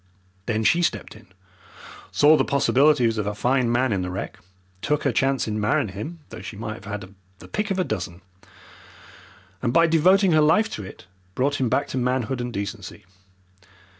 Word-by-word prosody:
Then 110 Hz, -1 st, 0 dB
she 170 Hz, +10 st, +3 dB
stepped 170 Hz, -, -2 dB
in, 110 Hz, -1 st, -16 dB, 0.8 s
saw 150 Hz, +2 st, +5 dB
the -, -, +2 dB
possibilities 135 Hz, -4 st, +3 dB
of 105 Hz, -, -2 dB
a 105 Hz, -, -2 dB
fine 125 Hz, +2 st, +1 dB
man 125 Hz, -1 st, +1 dB
in 95 Hz, -, -1 dB
the 90 Hz, -, -3 dB
wreck, 95 Hz, +2 st, -6 dB, 0.4 s
took 150 Hz, 0 st, 0 dB
her 135 Hz, -, +2 dB
chance 135 Hz, +1 st, +1 dB
in 105 Hz, 0 st, -2 dB
marrying 105 Hz, 0 st, +1 dB
him 130 Hz, -, -7 dB
though -, -, -9 dB
she 105 Hz, +1 st, -8 dB
might 110 Hz, 0 st, -6 dB
have -, -, -13 dB
had 100 Hz, -2 st, -7 dB, 0.2 s
the -, -, -13 dB
pick 210 Hz, 0 st, -3 dB
of 195 Hz, -, -1 dB
a 185 Hz, -, +2 dB
dozen, 90 Hz, -, -5 dB, 1.4 s
and, 120 Hz, -, 0 dB
by 165 Hz, +6 st, +5 dB
devoting 180 Hz, +4 st, +4 dB
her 155 Hz, -1 st, +4 dB
life 165 Hz, +9 st, +3 dB
to 105 Hz, -, -5 dB
it, 95 Hz, -, -11 dB, 0.3 s
brought 145 Hz, +3 st, 0 dB
him 125 Hz, -, +1 dB
back 140 Hz, +4 st, 0 dB
to 130 Hz, -, -2 dB
manhood 125 Hz, 0 st, -1 dB
and 120 Hz, 0 st, -4 dB
decency. 100 Hz, -2 st, -6 dB
125 Hz, 190 wpm, -23 LUFS, 105-150 Hz, 1.4 s, saw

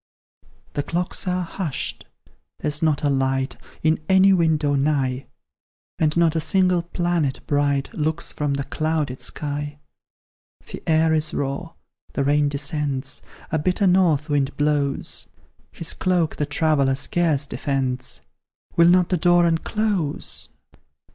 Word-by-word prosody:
The 145 Hz, -, 0 dB
clocks 175 Hz, +5 st, 0 dB
are 180 Hz, 0 st, 0 dB
hushed 165 Hz, -4 st, -4 dB, 0.5 s
there's 150 Hz, 0 st, 0 dB
not 155 Hz, -3 st, +1 dB
a 145 Hz, -, +2 dB
light 135 Hz, 0 st, 0 dB, 0.3 s
In 155 Hz, +1 st, +3 dB
any 190 Hz, +1 st, +6 dB
window 160 Hz, -5 st, +2 dB
nigh, 135 Hz, -2 st, 0 dB, 0.7 s
And 155 Hz, +1 st, +1 dB
not 165 Hz, -1 st, +3 dB
a -, -, +2 dB
single 185 Hz, +1 st, +3 dB
planet 170 Hz, -5 st, -1 dB
bright 145 Hz, -1 st, 0 dB
Looks 160 Hz, +2 st, -1 dB
from 145 Hz, -2 st, -1 dB
the 140 Hz, -, -2 dB
clouded 155 Hz, -4 st, -2 dB
sky; 145 Hz, 0 st, -3 dB, 0.9 s
The -, -, -9 dB
air 160 Hz, 0 st, +3 dB
is 155 Hz, 0 st, 0 dB
raw, 140 Hz, +5 st, -3 dB, 0.4 s
the 140 Hz, -, 0 dB
rain 145 Hz, +1 st, +2 dB
descends, 140 Hz, -2 st, -2 dB, 0.3 s
A 160 Hz, -, +1 dB
bitter 185 Hz, +6 st, +1 dB
north 175 Hz, -5 st, +3 dB
wind 145 Hz, -2 st, 0 dB
blows; 145 Hz, -1 st, -1 dB, 0.4 s
His 165 Hz, -, -1 dB
cloak 180 Hz, -4 st, 0 dB
the 150 Hz, -, -1 dB
traveller 145 Hz, -2 st, +2 dB
scarce 155 Hz, 0 st, +1 dB
defends 130 Hz, -2 st, -2 dB, 0.5 s
Will 170 Hz, 0 st, +6 dB
not 180 Hz, -1 st, +4 dB
the 180 Hz, -, +1 dB
door 175 Hz, +1 st, +4 dB
unclose? 170 Hz, -1 st, 0 dB
150 Hz, 130 wpm, -22 LUFS, 140-170 Hz, 0.9 s, any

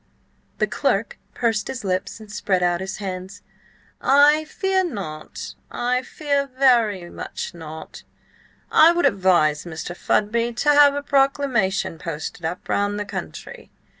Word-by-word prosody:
The -, -, +2 dB
clerk -, -, -1 dB, 0.2 s
pursed 225 Hz, -3 st, 0 dB
his 255 Hz, -, -5 dB
lips 185 Hz, +2 st, -2 dB
and 215 Hz, -1 st, -12 dB
spread 190 Hz, -3 st, 0 dB
out 175 Hz, 0 st, +1 dB
his 190 Hz, +1 st, -5 dB
hands. 190 Hz, 0 st, -6 dB, 0.6 s
"I 290 Hz, +3 st, +5 dB
fear 380 Hz, +4 st, 0 dB
not; 190 Hz, -, -6 dB, 0.2 s
I 250 Hz, +1 st, 0 dB
very 260 Hz, -, +1 dB
much -, -, -6 dB
fear 170 Hz, -, -14 dB
not. 160 Hz, 0 st, -9 dB, 0.7 s
I 325 Hz, +2 st, +7 dB
would 345 Hz, 0 st, +1 dB
advise 175 Hz, -6 st, +3 dB
Mr. 170 Hz, +1 st, -6 dB
Fudby 230 Hz, +5 st, 0 dB
to 265 Hz, +5 st, 0 dB
have 290 Hz, -1 st, +6 dB
a 285 Hz, -, -3 dB
proclamation 270 Hz, -, +1 dB
posted 160 Hz, +1 st, -6 dB
up 165 Hz, +3 st, -4 dB
round 205 Hz, 0 st, 0 dB
the 205 Hz, -, -3 dB
country." -, -, -8 dB
210 Hz, 135 wpm, -22 LUFS, 180-275 Hz, 0.7 s, I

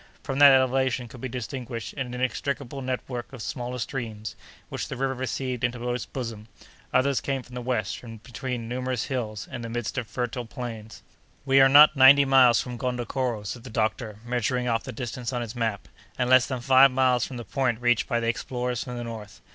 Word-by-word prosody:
From 135 Hz, 0 st, -3 dB
that 145 Hz, -1 st, +10 dB
elevation 130 Hz, -1 st, +2 dB
could 120 Hz, +1 st, -12 dB
be 130 Hz, -, -4 dB
distinguished 120 Hz, -3 st, -5 dB
an 130 Hz, -3 st, -4 dB
inextricable 135 Hz, +2 st, -3 dB
network 125 Hz, -1 st, -4 dB
of 135 Hz, -, -10 dB
smaller 125 Hz, +2 st, -4 dB
streams 115 Hz, -4 st, -5 dB, 0.3 s
which -, -, -4 dB
the -, -, -6 dB
river 135 Hz, +1 st, 0 dB
received 130 Hz, -1 st, -3 dB
into 120 Hz, 0 st, -1 dB
its 125 Hz, -, -4 dB
bosom; 115 Hz, -4 st, -6 dB, 0.4 s
others 140 Hz, 0 st, +2 dB
came 135 Hz, -2 st, -2 dB
from 125 Hz, -, -16 dB
the 125 Hz, -, -5 dB
west, 120 Hz, -6 st, -2 dB
from 115 Hz, -2 st, -10 dB
between 120 Hz, +1 st, -5 dB
numerous 125 Hz, 0 st, -2 dB
hills, 110 Hz, -6 st, -4 dB
in 120 Hz, -, -5 dB
the 115 Hz, -, -6 dB
midst 120 Hz, +2 st, -3 dB
of 120 Hz, -, -6 dB
fertile 120 Hz, 0 st, -3 dB
plains. 115 Hz, -3 st, -8 dB, 0.4 s
"We 135 Hz, 0 st, +5 dB
are 135 Hz, -, +7 dB
not 150 Hz, +2 st, +8 dB
ninety 140 Hz, +1 st, +8 dB
miles 130 Hz, -3 st, +6 dB
from 125 Hz, -2 st, -5 dB
Gondokoro," 125 Hz, -2 st, -2 dB
said 115 Hz, +3 st, -6 dB
the 130 Hz, -, -9 dB
doctor, 110 Hz, -1 st, -2 dB
measuring 125 Hz, +1 st, -1 dB
off 115 Hz, -1 st, 0 dB
the -, -, -5 dB
distance 120 Hz, +1 st, -5 dB
on 120 Hz, -2 st, -2 dB
his 115 Hz, +1 st, -7 dB
map, 110 Hz, -4 st, -2 dB, 0.3 s
"and 125 Hz, -, 0 dB
less 130 Hz, -1 st, +6 dB
than 130 Hz, -3 st, -4 dB
five 135 Hz, +2 st, +7 dB
miles 125 Hz, -2 st, +2 dB
from 130 Hz, -, -5 dB
the 120 Hz, -, -7 dB
point 130 Hz, -4 st, 0 dB
reached 120 Hz, -1 st, +2 dB
by 120 Hz, -3 st, 0 dB
the 115 Hz, -, -2 dB
explorers 125 Hz, +1 st, -2 dB
from 125 Hz, -2 st, -6 dB
the 120 Hz, -, -4 dB
north. 110 Hz, -4 st, -8 dB
125 Hz, 205 wpm, -26 LUFS, 115-130 Hz, 0.4 s, that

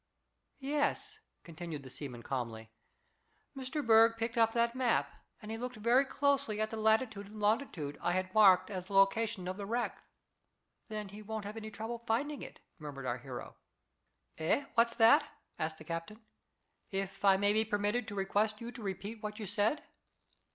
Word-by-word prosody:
"Yes," 290 Hz, +2 st, -1 dB, 0.2 s
continued 165 Hz, -3 st, -7 dB
the 130 Hz, -, -10 dB
seaman 125 Hz, -4 st, -7 dB
calmly, 115 Hz, -4 st, -4 dB, 0.8 s
"Mr. 270 Hz, +3 st, -4 dB
Berg 230 Hz, 0 st, +6 dB
picked 230 Hz, +2 st, -2 dB
up 225 Hz, -1 st, +4 dB
that 235 Hz, 0 st, +2 dB
map, 255 Hz, -1 st, +1 dB, 0.3 s
and 215 Hz, 0 st, -8 dB
he 225 Hz, -, -4 dB
looked 250 Hz, +1 st, -4 dB
very 235 Hz, +5 st, +3 dB
closely 280 Hz, -6 st, +1 dB
at 215 Hz, 0 st, 0 dB
the -, -, -3 dB
latitude 220 Hz, -1 st, +2 dB
and 215 Hz, +1 st, -10 dB
longitude 205 Hz, -, 0 dB
I 175 Hz, -, +1 dB
had 185 Hz, 0 st, -1 dB
marked 190 Hz, -3 st, +6 dB
as 185 Hz, -2 st, -4 dB
the 200 Hz, -, -8 dB
location 195 Hz, 0 st, +3 dB
of 185 Hz, +1 st, -3 dB
the 200 Hz, -, -5 dB
wreck." 240 Hz, +3 st, -2 dB, 0.9 s
"Then 210 Hz, -2 st, -4 dB
he 205 Hz, +2 st, -10 dB
won't 215 Hz, 0 st, -5 dB
have 205 Hz, +2 st, -6 dB
any 220 Hz, -1 st, -6 dB
trouble 220 Hz, +3 st, -5 dB
finding 245 Hz, +6 st, -1 dB
it," -, -, -10 dB, 0.2 s
murmured 145 Hz, -3 st, -7 dB
our 125 Hz, 0 st, -1 dB
hero. 125 Hz, 0 st, -8 dB, 0.8 s
"Eh? 165 Hz, -, +1 dB
What's 235 Hz, 0 st, +3 dB
that?" 225 Hz, 0 st, +7 dB, 0.4 s
asked 155 Hz, 0 st, -2 dB
the 155 Hz, -, -11 dB
captain, 165 Hz, +6 st, -5 dB, 0.7 s
"if 195 Hz, 0 st, -4 dB
I 195 Hz, -1 st, +6 dB
may 205 Hz, +1 st, +3 dB
be 220 Hz, +1 st, +3 dB
permitted 210 Hz, +2 st, 0 dB
to 205 Hz, -, -6 dB
request 205 Hz, +2 st, 0 dB
you 235 Hz, +1 st, -6 dB
to 240 Hz, -, -10 dB
repeat 205 Hz, +2 st, -5 dB
what 210 Hz, 0 st, -5 dB
you 215 Hz, -, -5 dB
said." 210 Hz, +8 st, +1 dB
215 Hz, 175 wpm, -33 LUFS, 185-230 Hz, 0.9 s, that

